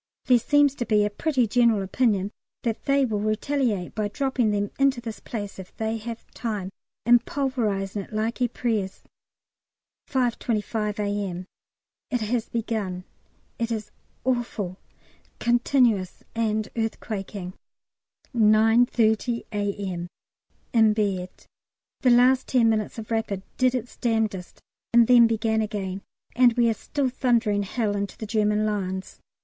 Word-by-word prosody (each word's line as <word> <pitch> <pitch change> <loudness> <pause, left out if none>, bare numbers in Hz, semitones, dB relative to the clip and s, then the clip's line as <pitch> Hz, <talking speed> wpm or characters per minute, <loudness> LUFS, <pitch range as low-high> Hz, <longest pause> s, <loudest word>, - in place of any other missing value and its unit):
There 250 -2 +5
seems 290 +2 +4
to 240 - -2
be 210 -1 +3
a 210 - -1
pretty 260 +2 +1
general 230 -2 +3
opinion 200 -1 +1 0.3
that 230 -2 -2
they 275 -1 +3
will 215 -4 -1
retaliate 215 -2 -1
by 215 -1 -1
dropping 255 0 0
them 205 -1 -1
into 275 -2 +3
this 230 -2 -7
place 205 -4 -6
if 185 - -11
they 220 0 -1
have 230 +1 -7
time, 210 -5 -4 0.3
and 240 0 +6
pulverising 215 -9 -1
it - - -12
like 220 +3 -2
Ypres. 225 -5 -1 1.1
5.25 225 -4 -1
A.M. 200 -3 -2 0.6
It 245 -3 -1
has 225 +1 -1
begun. 215 -6 -3 0.6
It 230 0 -1
is 220 -2 -4 0.3
awful 235 -7 -2 0.6
continuous 240 -5 +2
and 220 -1 0
earthquaking. 205 -4 -4 0.8
9.30 225 +1 +3
A.M. 200 -4 -3 0.7
In 220 -2 +5
bed. 195 -4 -1 0.7
The 255 - +3
last 250 +2 +5
ten 240 -3 +4
minutes 215 0 -1
of 225 0 -7
"Rapid" 220 -4 -1
did 255 0 +3
its 245 -1 -5
damnedest 220 -6 -1 0.3
and 235 -1 +8
then 240 -1 +7
began 220 0 +1
again, 200 -3 -3 0.3
and 245 -1 +6
we 235 0 +3
are - - +1
still 265 +5 -2
thundering 235 -5 +1
hell 205 +1 -1
into 200 0 -3
the 220 - -5
German 210 -1 +1
lines. 190 -3 -3
220 Hz, 130 wpm, -25 LUFS, 205-240 Hz, 1.1 s, and